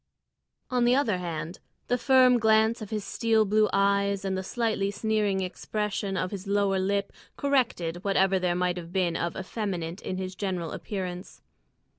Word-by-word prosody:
On 250 -1 +2
the 245 +1 +4
other 225 -9 +1
hand, 165 -1 -5 0.3
the 245 - +2
firm 255 -1 +5
glance 220 +1 +3
of 210 - -6
his 215 -2 -3
steel 220 +2 +2
blue 215 +1 +3
eyes 200 0 +1
and 190 -1 -1
the 190 - -2
slightly 215 -1 -1
sneering 205 -1 0
expression 200 +1 -3
of 185 0 -2
his 195 -1 -6
lower 200 -1 +2
lip 200 +1 -1 0.2
corrected 205 -11 0
whatever 195 -1 +2
there 180 -1 0
might 180 -1 -2
be 180 -3 0
of 170 0 -2
effeminate 185 -3 -4
in 185 - -4
his 185 0 -4
general 185 -4 -3
appearance. 185 -2 -6
195 Hz, 160 wpm, -27 LUFS, 185-215 Hz, 0.3 s, firm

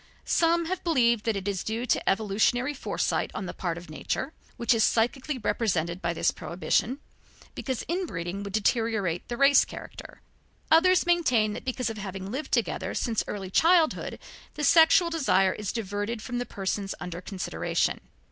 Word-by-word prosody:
Some 335 0 +2
have 370 +2 -3
believed 235 -9 +2
that 225 -2 +1
it 195 0 -4
is 195 -3 -2
due 225 +3 -3
to - - +1
evolutionary 220 +6 +1
foresight 280 - -1
on 195 - -4
the - - -5
part 175 -2 -3
of 175 - -10
nature, 210 - -4 0.2
which 235 +1 +2
is 225 -1 +2
psychically 255 +5 +1
represented 185 -6 -1
by 170 - 0
this 165 - +1
prohibition, 195 +8 -1 0.5
because 260 -3 -4
inbreeding 200 - -3
would 200 -1 -7
deteriorate 215 -5 0
the 240 - -4
race 275 +1 +6
character; - - -10 0.5
others 365 +3 +5
maintained 250 -12 +2
that - - -8
because 255 -3 -2
of 220 - -8
having 195 -1 -6
lived 275 +6 -5
together - - -1
since 230 -3 0
early 195 -2 -5
childhood 330 - +3 0.4
the 300 - -4
sexual 335 +3 +6
desire 195 - +2
is 210 -2 -4
diverted 205 +1 -3
from 245 -1 -3
the 245 - -4
persons 195 0 -3
under 180 0 -6
consideration. 185 0 -2
225 Hz, 165 wpm, -27 LUFS, 195-275 Hz, 0.5 s, race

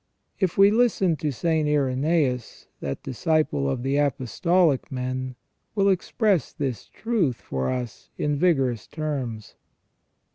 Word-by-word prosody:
If 185 -4 0
we 200 +1 +7
listen 215 -7 +3
to 150 +2 -1
St. 155 +3 0
Irenaeus, 140 -2 0
that 70 -1 -4
disciple 135 - 0
of 120 - -2
the 135 +2 +1
apostolic 145 - +1
men 130 0 -3 0.4
will 200 -1 +3
express 190 - +1
this 130 -7 -4
truth 210 - 0
for 65 -10 -3
us 125 -3 -4
in 150 0 0
vigorous 135 - +1
terms. 135 -9 -4
145 Hz, 120 wpm, -25 LUFS, 125-170 Hz, 0.4 s, we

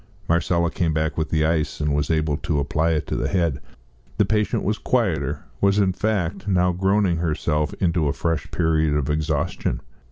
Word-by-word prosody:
Marcella 85 0 +1
came 85 -5 0
back 80 +1 0
with 80 -1 -2
the 80 -1 +2
ice, 80 -1 0
and 75 -1 0
was 75 0 0
able 80 -2 +1
to 80 0 -2
apply 75 +3 +1
it 75 -2 -1
to - - -3
the - - -1
head. 85 -7 0 0.6
The 105 - +4
patient 105 +1 0
was 105 +3 -1
quieter 75 - 0 0.2
was, 100 0 +3
in 95 -3 +3
fact, 100 -2 -1
now 90 -2 +3
groaning 95 0 +1
herself 75 -2 0
into 85 -4 +1
a 70 - +1
fresh 80 -2 -2
period 80 -2 +1
of 75 -1 0
exhaustion. 75 -1 -1
80 Hz, 185 wpm, -23 LUFS, 75-95 Hz, 0.6 s, The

